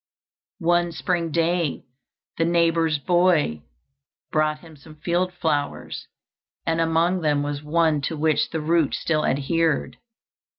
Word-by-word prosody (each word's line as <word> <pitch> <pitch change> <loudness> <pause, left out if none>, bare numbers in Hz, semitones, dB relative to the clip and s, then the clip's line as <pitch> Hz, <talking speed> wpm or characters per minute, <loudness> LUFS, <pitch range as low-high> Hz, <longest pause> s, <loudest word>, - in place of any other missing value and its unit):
One 175 0 +3
spring 170 -1 -1
day 170 -1 0 0.6
the - - +4
neighbor's 165 -2 +2
boy 170 - +2 0.7
brought 155 0 +1
him 165 -2 -14
some 155 +2 -15
field 175 +4 -1
flowers, 155 -5 -3 0.6
and 165 0 +1
among 165 +3 +1
them 145 -2 +1
was 145 0 -3
one 155 0 +1
to 160 - -5
which 155 0 +1
the 160 - -3
root 160 -1 +1
still 155 -2 0
adhered. 160 +3 0
165 Hz, 125 wpm, -23 LUFS, 150-170 Hz, 0.7 s, the